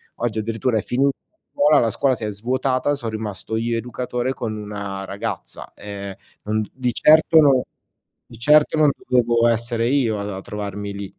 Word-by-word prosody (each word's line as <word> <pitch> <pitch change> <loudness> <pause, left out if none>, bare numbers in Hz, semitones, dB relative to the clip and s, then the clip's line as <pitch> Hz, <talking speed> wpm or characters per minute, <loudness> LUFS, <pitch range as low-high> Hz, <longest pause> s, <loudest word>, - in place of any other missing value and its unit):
Oggi, 115 -2 -2
addirittura 115 +2 -1
è 105 - -1
finita 135 +3 +1 0.2
la - - -45 0.2
scuola, 150 +1 +4
la 115 - +2
scuola 130 +3 +1
si 110 - -5
è 105 - -2
svuotata. 130 +6 0
Son 120 -6 -4
rimasto 110 0 -5
io 115 +1 -1
educatore 125 +2 -3
con 115 -4 -4
una 100 -2 -6
ragazza. 100 +1 -6
Ehm, 100 -1 -7 0.3
non 110 +1 0
di 125 -1 -2
certo 160 +4 +5
no 140 -4 +5 0.6
di 115 - -14
certo 150 +5 +4
non 150 -2 +5 0.2
dovevo 120 -2 +3
essere 115 0 0
io 125 -6 +1
a 100 -1 -4
a - - -7
trovarmi 100 -2 -5
lì. 100 -1 -8
115 Hz, 175 wpm, -21 LUFS, 105-130 Hz, 0.6 s, certo